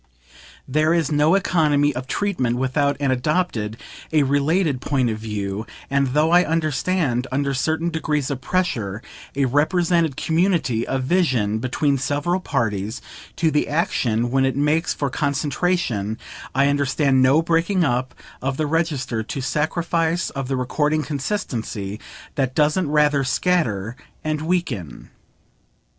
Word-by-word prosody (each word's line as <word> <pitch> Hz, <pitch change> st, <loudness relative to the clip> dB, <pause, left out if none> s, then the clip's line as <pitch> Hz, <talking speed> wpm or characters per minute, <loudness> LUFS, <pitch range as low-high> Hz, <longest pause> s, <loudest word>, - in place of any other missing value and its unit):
There 155 Hz, +4 st, +2 dB
is 160 Hz, -3 st, 0 dB
no 150 Hz, +4 st, +4 dB
economy 150 Hz, -6 st, +2 dB
of 125 Hz, +1 st, -5 dB
treatment 140 Hz, -12 st, -1 dB
without 140 Hz, +2 st, +1 dB
an 140 Hz, -2 st, +1 dB
adopted, 125 Hz, -5 st, -1 dB, 0.3 s
a 155 Hz, -2 st, +4 dB
related 145 Hz, +1 st, +1 dB
point 130 Hz, -5 st, +1 dB
of 110 Hz, -, -4 dB
view, 105 Hz, -1 st, -4 dB, 0.2 s
and 140 Hz, -1 st, +1 dB
though 155 Hz, +2 st, +3 dB
I 175 Hz, +1 st, +6 dB
understand, 155 Hz, -4 st, 0 dB
under 140 Hz, +1 st, 0 dB
certain 160 Hz, +5 st, 0 dB
degrees 150 Hz, -3 st, -1 dB
of 130 Hz, -2 st, -4 dB
pressure, 120 Hz, -, -1 dB, 0.3 s
a 140 Hz, 0 st, +2 dB
represented 160 Hz, +2 st, +2 dB
community 160 Hz, -, +1 dB
of 135 Hz, -1 st, -1 dB
vision 130 Hz, -, +1 dB
between 135 Hz, +3 st, 0 dB
several 145 Hz, +7 st, 0 dB
parties 110 Hz, -, -2 dB, 0.4 s
to 160 Hz, -2 st, +1 dB
the 150 Hz, -, +1 dB
action 120 Hz, -7 st, 0 dB
when 135 Hz, 0 st, +2 dB
it 135 Hz, -1 st, +1 dB
makes 150 Hz, +4 st, +1 dB
for 140 Hz, -3 st, -2 dB
concentration, 140 Hz, -, -1 dB, 0.4 s
I 135 Hz, +1 st, +4 dB
understand 140 Hz, -1 st, +2 dB
no 135 Hz, +5 st, +4 dB
breaking 170 Hz, +3 st, +2 dB
up 130 Hz, -3 st, -1 dB, 0.3 s
of 135 Hz, +1 st, -2 dB
the 155 Hz, -, 0 dB
register, 145 Hz, -7 st, -1 dB
no 135 Hz, -, -2 dB
sacrifice 165 Hz, +4 st, 0 dB
of 135 Hz, -3 st, -4 dB
the 135 Hz, 0 st, -1 dB
recording 150 Hz, +4 st, 0 dB
consistency, 120 Hz, -, -3 dB, 0.3 s
that 130 Hz, -3 st, -1 dB
doesn't 150 Hz, +2 st, +2 dB
rather 150 Hz, -2 st, +3 dB
scatter 125 Hz, -, 0 dB, 0.3 s
and 155 Hz, -1 st, -1 dB
weaken. 155 Hz, -, -3 dB
145 Hz, 135 wpm, -22 LUFS, 125-160 Hz, 0.4 s, I